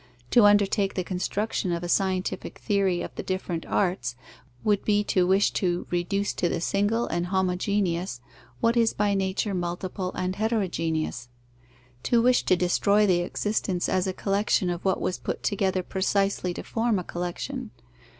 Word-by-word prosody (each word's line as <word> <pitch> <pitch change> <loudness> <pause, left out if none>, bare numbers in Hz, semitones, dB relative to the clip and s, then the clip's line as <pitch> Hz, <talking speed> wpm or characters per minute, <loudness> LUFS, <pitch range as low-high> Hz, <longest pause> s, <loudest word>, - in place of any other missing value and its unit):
To 235 -4 +6
undertake 205 -1 +3
the 185 - -1
construction 190 +2 -2
of 170 0 -2
a - - -3
scientific 185 +1 -1
theory 195 -4 +1
of - - -7
the - - -5
different 185 -3 -3
arts, 150 -11 0 0.5
would 205 -2 +2
be 205 -1 +2
to 185 -3 +2
wish 195 +2 +3
to 175 -2 -1
reduce 195 +3 0
to 175 - 0
the - - -1
single 205 +6 +1
and 175 +1 -2
homogeneous 185 - 0 0.4
what 230 +1 +3
is 230 -1 +3
by 205 0 +1
nature 195 +1 -1
multiple 180 +1 -3
and 185 0 -2
heterogeneous; 165 - -1 0.7
to 235 - +2
wish 245 +2 +4
to 185 - +4
destroy 200 +4 +3
the 180 -3 +3
existence 185 0 -1
as 185 0 +1
a - - 0
collection 195 -1 +1
of 175 0 -5
what 190 -1 +1
was 185 - -2
put - - -4
together 190 -2 0
precisely 195 0 0
to - - -5
form 225 -2 0
a 180 - -2
collection. 195 +10 -4
190 Hz, 160 wpm, -26 LUFS, 180-205 Hz, 0.7 s, To